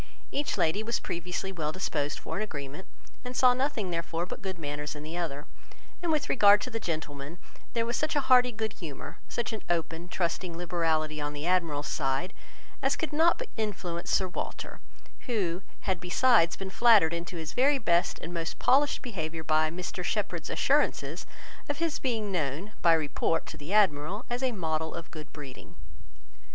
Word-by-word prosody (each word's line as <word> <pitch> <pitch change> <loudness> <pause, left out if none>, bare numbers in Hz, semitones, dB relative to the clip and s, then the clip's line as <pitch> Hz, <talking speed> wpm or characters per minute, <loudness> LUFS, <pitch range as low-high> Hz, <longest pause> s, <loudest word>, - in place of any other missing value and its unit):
Each 290 +1 -1
lady 165 +6 +2
was 230 +2 -1
previously 180 +3 -3
well 155 -5 -2
disposed 150 -5 -1
for - - -5
an - - -1
agreement, 145 -4 -5 0.4
and 250 0 -5
saw 250 -1 +7
nothing, 250 -7 -1
therefore, 165 0 -2
but - - -7
good 190 -3 -4
manners 150 -1 -4
in 150 - -7
the 155 +2 -6
other; 155 -5 -3 0.6
and 345 -2 0
with 300 -2 +1
regard 205 -4 +7
to 255 - -4
the 225 - -2
gentlemen, 155 -3 -4 0.4
there 230 -1 +1
was 235 +1 -1
such 310 0 0
an 290 - +2
hearty 250 -1 +6
good 220 -1 -3
humour, 155 -6 -8
such 240 -1 -2
an 220 - -4
open, 165 0 -1
trusting 170 -1 -2
liberality 160 -3 0
on 145 0 -2
the 145 +1 -5
Admiral's 165 -5 +1
side, 145 +6 -1 0.5
as 275 +1 +2
could 320 +1 -3
not 325 +3 +5
but - - -6
influence 180 -6 -3
Sir 190 - +3
Walter, 180 - -5 0.5
who 190 -7 0 0.2
had 190 -3 0
besides 180 0 +4
been 190 -1 -6
flattered 210 -8 +6
into 170 +1 -4
his 160 -2 -5
very 275 +3 +4
best 175 -8 +2
and 170 - -5
most 165 -1 -3
polished 285 +2 +3
behaviour 165 - -4
by 155 0 +3
Mr 180 +2 -5
Shepherd's 175 -5 -2
assurances 290 +2 +1 0.4
of 290 - -1
his 330 -1 0
being 225 -6 -1
known, 165 +3 -2
by 170 - +6
report, 160 +1 +1
to - - -8
the 150 +4 -8
Admiral, 195 0 +3
as 245 +1 -1
a 260 -1 +2
model 160 -6 -2
of 170 -1 -7
good 155 -2 -9
breeding. 140 -4 -10
175 Hz, 180 wpm, -29 LUFS, 160-230 Hz, 0.6 s, saw